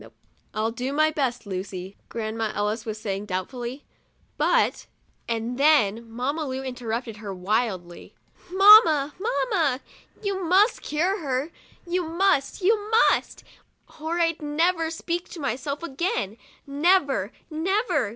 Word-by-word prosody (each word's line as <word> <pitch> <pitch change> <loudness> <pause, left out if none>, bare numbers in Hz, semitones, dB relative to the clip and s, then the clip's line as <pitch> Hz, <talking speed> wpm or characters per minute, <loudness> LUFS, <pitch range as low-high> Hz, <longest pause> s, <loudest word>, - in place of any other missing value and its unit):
" - - -40
I'll 220 +1 0
do 250 +4 -4
my 310 +1 +3
best, 260 -6 -2
Lucy," 190 0 -6
Grandma 220 -1 -3
Ellis 210 +2 -2
was 215 -1 -4
saying, 200 -1 -4
doubtfully, 240 +8 -5 0.3
" - - -40
but - - +2
— - - -39
" - - -42
and 230 +2 -2
then 235 -7 +3
Mamma 270 +7 -2
Lu 260 0 -4
interrupted 240 -3 -4
her 210 -2 -7
wildly: 185 -2 -2 0.3
1 365 +1 -7
Mamma! 385 -9 +8
Mamma! 385 - 0 0.4
You 390 -2 -2
must 380 +7 +3
cure 355 +7 0
her, 275 0 -2 0.3
you 360 +1 0
must, 340 -1 0
you 420 +1 +2
must, 450 +1 +2 0.6
or 320 +3 -2
I'd 330 -2 +1
never 325 +3 +1
speak 340 +2 -4
to 345 - -9
myself 280 +3 -3
again, 270 - -2 0.3
never, 280 - +2 0.2
never! 320 - 0
275 Hz, 140 wpm, -25 LUFS, 225-340 Hz, 0.6 s, Mamma